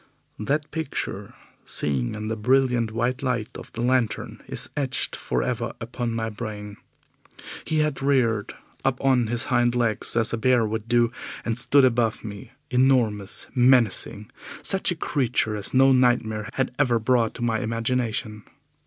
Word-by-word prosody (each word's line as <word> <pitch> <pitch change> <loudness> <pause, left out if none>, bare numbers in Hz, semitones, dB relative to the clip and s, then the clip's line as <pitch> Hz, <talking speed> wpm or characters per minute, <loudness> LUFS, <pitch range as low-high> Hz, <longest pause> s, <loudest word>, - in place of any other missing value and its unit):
That 145 +7 -1
picture, 160 -3 -4 0.3
seen 65 - -1
in 105 0 -5
the 110 - -2
brilliant 125 0 +2
white 120 +3 -1
light 125 -5 -2
of - - -10
the 115 - -4
lantern, 125 -3 0
is - - -1
etched 135 -3 -2
for - - -2
ever 120 -2 -2
upon 120 0 -4
my 110 -1 -2
brain. 105 -1 -7 0.9
He 155 -1 +1
had 150 -3 -1
reared 125 -7 +1 0.3
up 135 -2 0
on 125 -4 +3
his 120 +2 0
hind 120 0 +3
legs 115 -3 -1
as 115 0 +1
a - - 0
bear 120 0 +3
would 110 0 -4
do, 120 -1 +3 0.3
and 115 - 0
stood 130 +2 +5
above 115 -3 +1
me, 105 +2 -8 0.2
enormous, 125 -6 +2
menacing 120 -4 +3 0.3
such 195 -1 +2
a 175 - 0
creature 125 -8 0
as 105 -1 -2
no 135 +1 +5
nightmare 120 -4 +2
had 135 -2 -1
ever 125 -5 +3
brought 115 0 +1
to 120 - -5
my 115 -2 +1
imagination. 115 -2 -2
120 Hz, 155 wpm, -24 LUFS, 110-130 Hz, 0.9 s, stood